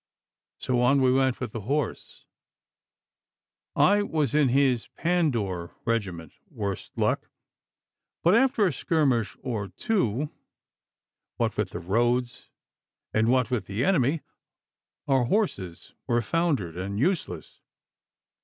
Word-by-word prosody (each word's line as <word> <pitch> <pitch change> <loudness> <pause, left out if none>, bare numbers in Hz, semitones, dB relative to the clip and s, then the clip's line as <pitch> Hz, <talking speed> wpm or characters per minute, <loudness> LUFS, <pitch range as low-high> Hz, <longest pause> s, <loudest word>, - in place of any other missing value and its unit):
So 125 -1 0
on 135 +3 +4
we 130 -1 +4
went 130 -1 +2
with 125 -4 -4
the 115 - -5
horse 140 +8 -3 1.5
I 205 +1 +4
was 155 - -1
in 150 -3 +4
his 130 -2 +2
Pandour 115 - 0
regiment, 95 -9 -2 0.2
worse 100 -2 -4
luck! - - 0 0.9
But 175 - +5
after 235 -2 +4
a 180 - +1
skirmish 135 -6 +1
or 110 -6 -3
two, 135 - -1 1.1
what - - 0
with - - -1
the - - -6
roads 120 +6 0 0.6
and 110 +1 +2
what 125 +1 +2
with 110 -7 -1
the 105 +6 -1
enemy, 155 -4 +2 0.9
our 135 -3 +3
horses 110 - -2
were 120 0 +1
foundered 140 - 0
and 95 +3 -4
useless. 140 - -2
125 Hz, 115 wpm, -26 LUFS, 105-150 Hz, 1.5 s, But